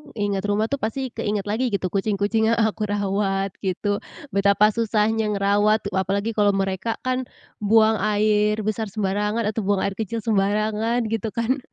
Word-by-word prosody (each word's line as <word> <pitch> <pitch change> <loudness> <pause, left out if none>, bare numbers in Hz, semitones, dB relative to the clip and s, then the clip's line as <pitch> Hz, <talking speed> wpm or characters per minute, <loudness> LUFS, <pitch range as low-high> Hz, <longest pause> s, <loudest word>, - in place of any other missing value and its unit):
ingat 205 -3 -1
rumah 210 +2 +1
tuh 280 - +1
pasti 260 +4 -2
keinget 205 -1 -2
lagi 240 +4 0
gitu 195 -2 0
kucing-kucing 210 +2 +1
yang - - 0
aku 215 0 0
rawat 195 -1 0
gitu 200 +2 -1 0.4
betapa 200 +1 +4
susahnya 220 -1 +1
ngerawat 205 +2 +2
apalagi 195 +3 0
kalau 205 -1 +4
mereka 195 +3 -1
kan, 255 0 0 0.4
buang 220 +1 +4
air 210 0 +2
besar 215 +1 -2
sembarangan 210 +2 -1
atau 220 +1 -2
buang 200 -1 +1
air 200 - -1
kecil 225 +2 -2
sembarangan 215 +3 +1
gitu 225 0 -1
kan, 235 +4 0
210 Hz, 155 wpm, -23 LUFS, 200-220 Hz, 0.4 s, betapa